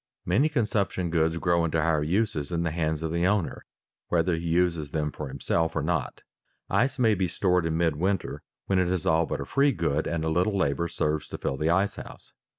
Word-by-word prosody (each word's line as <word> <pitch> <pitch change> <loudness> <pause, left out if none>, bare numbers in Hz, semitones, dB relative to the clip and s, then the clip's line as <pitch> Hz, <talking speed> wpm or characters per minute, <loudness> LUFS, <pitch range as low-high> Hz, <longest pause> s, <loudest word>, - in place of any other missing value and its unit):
_ - - -67 0.2
Many 115 - +3
consumption 105 - -1
goods 80 0 +1
grow 85 0 +2
into 80 0 0
higher 80 -1 +2
uses 90 -1 0
in 85 -1 0
the 80 - -1
hands 80 -1 -1
of 80 - -2
the 85 +2 +1
owner, 95 -4 -1 0.4
whether 85 +1 +1
he 85 +1 -4
uses 85 -3 +1
them 75 0 -2
for 75 - -6
himself 70 +5 -1
or - - 0
not. 75 -6 -2 0.5
Ice 130 +1 +2
may 115 -4 +4
be 95 -2 0
stored 90 -1 +1
in 80 0 -1
midwinter 85 +3 0 0.2
when 95 -1 +1
it 90 - +2
is 90 -2 -1
all 80 0 +3
but - - -3
a - - -4
free 140 - +3
good 80 -4 -1
and 80 -1 -2
a - - 0
little 90 +5 +1
labor 80 -2 0
serves 75 -2 -1
to - - -6
fill - - -2
the 75 +3 0
ice 95 +4 +1
house. - - -11
85 Hz, 220 wpm, -27 LUFS, 80-95 Hz, 0.5 s, may